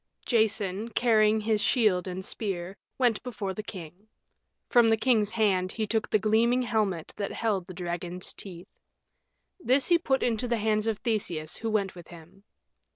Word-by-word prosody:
Jason, 215 -2 0
carrying 220 -2 +3
his 215 -1 +1
shield 210 -8 +2
and 185 +1 -5
spear, 190 -4 -4 0.2
went 245 -4 +2
before 215 -6 -4
the 215 - -5
king. 185 0 -10 0.6
From 235 -2 +5
the 225 - +3
king's 220 -3 +2
hand 195 -5 +1
he 220 - -1
took 220 +1 -1
the - - +4
gleaming 230 +4 +2
helmet 210 -8 -1
that 200 -1 -3
held 200 -6 -1
the 185 - -9
dragon's 175 0 -4
teeth. 180 -1 -10 0.8
This 270 -3 +2
he 345 -1 +5
put 265 -5 0
into 240 0 0
the 235 -1 0
hands 215 0 0
of 220 -2 0
Theseus, 180 -10 -2
who 225 - -3
went 200 -3 0
with 175 -2 -12
him. 175 +3 -15
215 Hz, 165 wpm, -28 LUFS, 185-225 Hz, 0.8 s, From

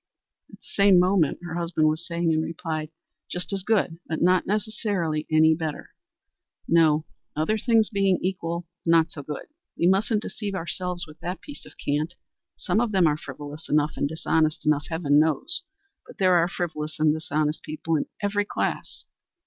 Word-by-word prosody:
At - - -13
the - - -31
same 200 -2 +4
moment 180 -4 +3
her 175 -2 -6
husband 170 -2 +1
was 155 +2 -1
saying 170 -1 0
in 155 0 +2
reply, 160 -1 -4 0.4
"Just 180 +3 -3
as 195 - -1
good, 190 -5 +1
but 160 - -2
not 180 +1 +3
necessarily 200 -7 -1
any 160 0 +6
better. 160 -2 -4 0.8
No 160 -2 +4 0.3
other 155 +8 +1
things 220 0 +2
being 195 -3 +2
equal 175 -2 -3 0.2
not 165 -1 +4
so 145 - -7
good. 145 0 -6 0.3
We - - +1
mustn't 205 +4 +2
deceive 205 -3 -4
ourselves 180 0 -2
with 155 -1 -15
that 180 +2 -4
piece 290 - -11
of - - -16
cant. 150 +4 -1 0.4
Some 185 +4 0
of 240 -2 0
them 190 -4 +4
are 150 -2 +3
frivolous 145 +1 -9
enough, 150 0 +2
and 140 - -1
dishonest 160 0 0
enough, 150 -1 +2
heaven 155 -3 +3
knows, 160 - +2 0.5
but - - -11
so - - -37
there 185 -2 +4
are 170 -1 +4
frivolous 155 -5 -4
and 155 -1 +4
dishonest 155 -1 -1
people 160 +1 -2
in 150 - -1 0.2
every 205 0 +1
class. - - -3
165 Hz, 175 wpm, -25 LUFS, 155-185 Hz, 0.8 s, any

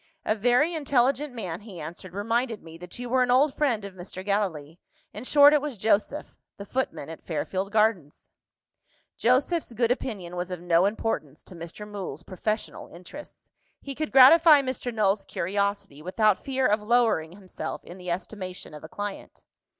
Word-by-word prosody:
"A - - +2
very 245 - +2
intelligent 280 -1 +1
man," 185 -8 -5
he 200 -5 -10
answered, 170 +4 -9
"reminded 230 +2 -1
me 165 0 -11
that 180 0 -9
you 245 0 -5
were 255 +1 +2
an 250 - +2
old 265 +3 +4
friend 240 -9 0
of 200 - -8
Mr. 185 +1 -9
Gallilee. 175 -6 -2 0.3
In 210 - -7
short, 290 +2 +7
it 300 - +4
was 290 -5 -5
Joseph 210 +1 0 0.2
the 200 - -8
footman 255 - -3
at 165 0 -9
Fairfield 185 +5 -3
Gardens." 210 -9 0 0.8
Joseph's 260 +6 +1
good 230 +1 +1
opinion 200 -9 -3
was 180 +1 -3
of 180 -2 -5
no 175 +1 +3
importance 200 -9 -3
to 185 - -12
Mr. 170 +5 -8
Mool's 190 -7 -6
professional 210 +4 -4
interests. 185 - -13 0.3
He 280 - -7
could 310 +2 -4
gratify 295 +3 +8
Mr. 255 -1 -3
Null's 210 -3 +1
curiosity 200 -5 -2
without 205 +4 +1
fear 265 -1 0
of 210 -1 +2
lowering 215 -8 +2
himself 190 -1 -7
in 180 +2 -11
the 180 0 -7
estimation 185 0 -5
of 150 - -10
a 160 - -9
client. 205 +2 -7
210 Hz, 170 wpm, -26 LUFS, 180-250 Hz, 0.8 s, gratify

